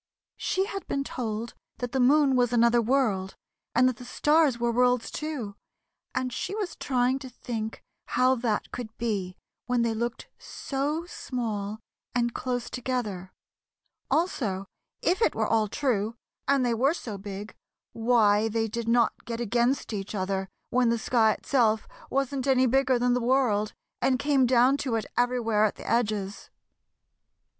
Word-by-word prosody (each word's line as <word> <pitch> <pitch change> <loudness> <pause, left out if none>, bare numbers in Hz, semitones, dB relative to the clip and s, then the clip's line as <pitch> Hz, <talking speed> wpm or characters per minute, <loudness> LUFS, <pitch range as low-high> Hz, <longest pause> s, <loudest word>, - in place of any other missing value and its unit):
She 380 +1 0
had 390 -1 -6
been 275 - -1
told 230 -3 -4 0.2
that 245 -1 -4
the 265 - 0
moon 275 +1 +5
was 245 -1 +3
another 235 0 +4
world, 220 -6 +1 0.4
and 250 +2 +5
that 255 -3 0
the 250 - -10
stars 295 +1 +3
were 235 0 +1
worlds, 250 0 +2
too, 285 -10 -4 0.6
and 255 -1 -1
she 400 - -3
was 410 -5 -3
trying 255 0 +1
to 265 -1 -8
think 225 -2 -5 0.2
how 255 +1 +3
that 230 -4 -1
could 225 -3 -7
be 200 -6 -2 0.3
when 245 -1 +2
they 230 -1 +1
looked 235 +2 -3
so 295 +4 -3
small 220 - -4 0.4
and 240 -1 +1
close 245 -2 -2
together; 225 -8 -3 0.8
also 220 - 0 0.4
if 370 +5 +2
it - - +3
were - - +1
all 220 -1 +2
true, 225 -2 -1 0.3
and 275 -2 +3
they 240 - +2
were 270 +8 +2
so 215 - -6
big, 200 +1 -7 0.4
why 225 -2 +3
they 225 0 0
did 230 +1 -4
not 235 -1 +2
get 230 0 -4
against 240 +2 0
each 200 0 -4
other 190 0 -2 0.2
when 245 -1 +3
the 235 - +2
sky 225 -1 +3
itself 225 -6 +1 0.2
wasn't 275 0 -1
any 260 -1 +4
bigger 260 0 +3
than 245 0 +2
the 250 - +1
world 235 -4 +2 0.3
and 260 -1 +3
came 270 0 +3
down 255 +2 +4
to 260 -5 -1
it 220 -3 -1
everywhere 240 -3 +2
at 215 - +2
the - - -10
edges. 210 -4 -1
240 Hz, 160 wpm, -27 LUFS, 220-260 Hz, 0.8 s, moon